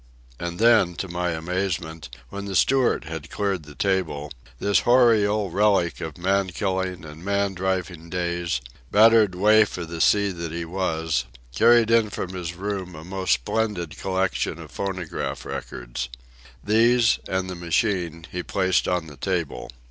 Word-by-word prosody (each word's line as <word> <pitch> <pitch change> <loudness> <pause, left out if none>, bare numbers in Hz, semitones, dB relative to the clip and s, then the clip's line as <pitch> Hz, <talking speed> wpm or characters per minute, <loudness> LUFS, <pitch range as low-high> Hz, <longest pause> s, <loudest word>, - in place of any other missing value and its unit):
And 85 0 -4
then, 110 -5 +4
to 95 - -4
my 90 0 -2
amazement, 80 -1 -3 0.2
when 100 0 -6
the 100 -1 -4
steward 130 +8 +3
had 80 -1 -7
cleared 100 -6 -2
the 75 -1 -12
table, 85 -7 -1 0.3
this 100 +9 +2
hoary 120 -4 +5
old 105 -4 -1
relic 100 -4 +2
of 80 +1 -6
man 95 +2 +1
killing 95 -2 -2
and 75 +2 -11
man 100 0 0
driving 90 -3 -3
days, 85 -5 -2 0.3
battered 110 -2 +5
waif 105 +2 +4
of 85 -2 -5
the 85 -1 -4
sea 100 -1 +4
that 85 -3 -5
he 85 +1 -4
was, 80 -6 -1 0.3
carried 115 - +5
in 115 -2 +4
from 95 -2 -5
his 85 -2 -5
room 95 -2 -4
a 75 - -9
most 95 +2 0
splendid 90 - -1
collection 95 0 -1
of - - -11
phonograph 95 -4 -4
records. - - -5 0.5
These, 115 +2 +4
and 95 0 -1
the 90 - -4
machine, 85 -1 -1
he 90 - -3
placed 95 +1 +1
on 90 -2 0
the 75 -3 -12
table. 85 -1 -3
95 Hz, 155 wpm, -24 LUFS, 85-100 Hz, 0.5 s, hoary